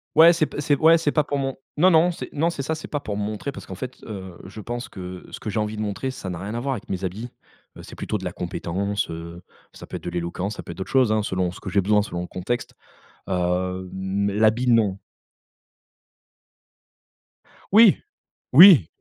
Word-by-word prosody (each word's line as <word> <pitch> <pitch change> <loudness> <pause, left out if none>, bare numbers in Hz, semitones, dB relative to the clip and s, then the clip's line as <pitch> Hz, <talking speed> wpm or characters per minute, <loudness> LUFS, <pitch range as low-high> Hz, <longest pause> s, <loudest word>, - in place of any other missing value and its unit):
Ouais 165 +2 +8
c'est 160 -2 +1
p - - -7
c'est 145 -1 +2
ouais 165 +1 +6
c'est 150 -3 0
pas 150 - +2
pour 145 -1 -2
mon 135 -1 -2 0.2
non 185 +4 +5
non 165 +2 +5
c'est - - -7
non 160 +3 +1
c'est 140 -5 -4
ça, 160 - -1
c'est 155 - -7
pas 145 - -3
pour 105 -7 -5
me 105 - -2
montrer 110 +6 -4
parce - - -10
qu'en - - -7
fait, 130 -1 -7
heu, 95 -4 -8
je 105 +3 -9
pense 120 +3 -5
que 90 -1 -8
ce - - -7
que 110 - -5
j'ai 110 - -1
envie 105 0 -2
de - - -3
montrer 105 +5 -3
ça 115 -7 -6
n'a 90 - -5
rien 105 +5 -5
à - - -2
voir 135 +2 -1
avec 110 -5 -8
mes 95 0 -3
habits, 105 +7 -4 0.5
heu, - - -10
c'est - - -11
plutôt 105 - -3
de 95 - -8
la 90 - -2
compétence, 100 +3 -3
heu, 85 +1 -8 0.3
ça - - -11
peut - - -6
être - - -14
de - - -3
l'éloquence, 90 +4 -3
ça - - -8
peut - - -8
être - - -10
d'autres 95 - -6
choses, 130 -5 +4
hein, 110 - +2
selon 95 -3 -1
ce 90 - -12
que 95 - -6
j'ai 100 +2 +2
besoin, 105 +2 +3
selon 85 -4 -4
le 90 - -5
contexte, 110 +7 -4 0.6
heu, 90 0 -1
mmh, 95 +1 -2
mais 100 - -1
l'habit 110 +4 +2
non. 105 -5 +3 2.7
Oui! 215 -1 +7 0.6
Oui. 175 - +9
105 Hz, 235 wpm, -23 LUFS, 95-135 Hz, 2.7 s, Oui